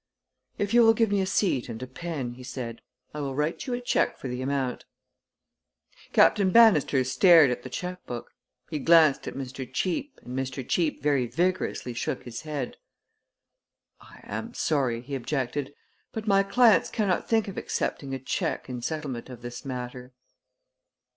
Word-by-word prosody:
"If 205 +2 -1
you 240 - +7
will 225 -1 +6
give 225 -2 +2
me 200 -1 +2
a 190 - -1
seat 155 - +1
and 115 -1 -6
a - - -3
pen," 135 -2 -5
he 125 - -12
said, 125 -2 -6 0.3
"I 150 - -5
will 135 -2 -3
write 150 - -2
you 250 - -1
a - - -3
check 245 - +1
for - - -6
the 125 +1 -4
amount." 135 -1 -2 1.3
Captain 195 -2 +5
Bannister 185 - +5
stared 140 +3 +6
at 125 - -3
the 130 - -8
checkbook. 180 -5 -6 0.4
He 155 - -2
glanced 160 -2 +5
at - - -5
Mr. 130 -1 -6
Cheape 185 - -2
and 125 +1 -7
Mr. 130 -1 -4
Cheape 165 -5 0
very 140 -4 +2
vigorously 170 -3 -1
shook 120 - -3
his 120 -2 -7
head. 150 -5 -4 1.2
"I - - -16
am - - -6
sorry," 130 -7 0
he 135 +3 -9
objected; 135 +1 -2 0.4
"but 220 -1 -5
my 195 -2 +4
clients 225 +3 +4
cannot 200 -5 -1
think 225 -2 +2
of 195 - -6
accepting 135 -2 -3
a - - -5
check 130 - -2
in 125 -1 -5
settlement 140 -4 -4
of 120 -2 -10
this 120 0 -7
matter." 125 -1 -6
140 Hz, 165 wpm, -27 LUFS, 125-180 Hz, 1.3 s, you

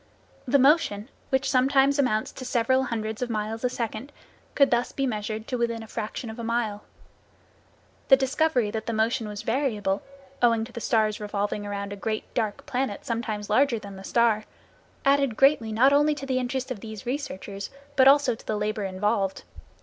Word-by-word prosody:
The 275 +3 +4
motion, 265 -6 +3 0.2
which 265 0 +1
sometimes 270 +2 +3
amounts 220 -6 +1
to - - -9
several 260 +1 +1
hundreds 220 -2 -3
of 250 - -1
miles 220 +1 -3
a 250 - +2
second 235 +2 -4 0.4
could 275 -2 +4
thus 240 0 +1
be 275 - -1
measured 215 -2 -3
to 250 - -1
within 230 -1 -1
a - - -11
fraction 220 +2 -5
of 220 - -10
a - - -4
mile. 225 -3 -1 1.3
The 270 - +8
discovery 265 -4 +1
that 220 0 -4
the 230 - -1
motion 225 +1 0
was 210 0 -6
variable, 220 -6 0 0.4
owing 230 -2 +3
to 235 - -13
the 235 - -7
star's 215 -2 +1
revolving 205 0 -3
around 200 0 -4
a - - -5
great 215 +2 -3
dark 215 -3 -2
planet 250 -5 -2
sometimes 220 -3 -3
larger 250 +3 +3
than 200 -2 -9
the 190 - -10
star, 225 -1 +2 0.6
added 275 -4 +3
greatly 270 -5 +4
not 255 +6 +4
only 295 +1 +4
to 275 - -6
the 260 -1 0
interest 260 +1 -3
of 240 - -4
these 215 -1 -8
researches, 210 -7 -4 0.3
but 265 -1 +6
also 285 -2 +6
to 225 - -11
the 215 - -1
labor 210 0 -2
involved. 195 0 -1
230 Hz, 185 wpm, -26 LUFS, 215-265 Hz, 1.3 s, The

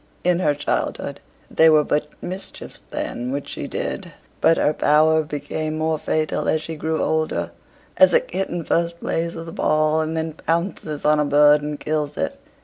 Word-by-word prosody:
In 180 0 +2
her 150 -5 +2
childhood, 145 +1 -2 0.3
they 160 - +6
were 155 -1 +5
but 150 +1 0 0.2
mischiefs 185 +2 -6
then 125 +1 -4
which 140 +1 -4
she - - -5
did; - - -4 0.3
but 165 - +5
her 150 - +2
power 155 +2 +4
became 155 +1 -4
more 160 0 0
fatal 155 0 -1
as 155 0 +1
she 160 - -5
grew 160 +1 -2
older 120 - 0 0.5
as 185 0 +7
a - - +6
kitten 175 -2 -3
first 170 +1 0
plays 170 0 -2
with 165 0 -7
a - - -6
ball, 155 0 +2
and 160 +1 -2
then 160 0 -2
pounces 165 -2 -2
on 150 0 +4
a 150 - +2
bird 145 +1 +5
and 150 0 -4
kills 150 -1 -2
it. - - -2
155 Hz, 180 wpm, -22 LUFS, 150-165 Hz, 0.5 s, as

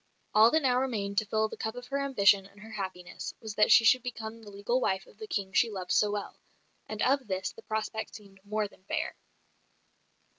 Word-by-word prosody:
All 220 +2 +7
that 315 +4 +2
now 250 -1 +3
remained 205 -6 0
to 215 - -5
fill 220 +1 +1
the - - -8
cup 220 +1 -4
of 245 0 -7
her 280 0 -1
ambition 200 -7 +4
and 200 +1 -20
her 220 +1 -11
happiness 185 -4 -6
was 220 -2 -6
that 210 +1 +4
she 225 - +8
should 255 +3 +6
become 230 -2 -6
the 215 - -11
legal 205 +6 -1
wife 190 -4 0
of - - -20
the 435 - -7
King 195 - -3
she 235 - +4
loved 185 -4 -5
so 210 - +4
well; 205 -1 -4 0.5
and 215 -1 -2
of 265 -1 +2
this 190 -1 -2
the - - -14
prospect 220 0 -3
seemed 200 -2 -13
more 210 +1 -1
than 185 - -22
fair. 315 +8 -2
215 Hz, 220 wpm, -30 LUFS, 200-240 Hz, 0.5 s, she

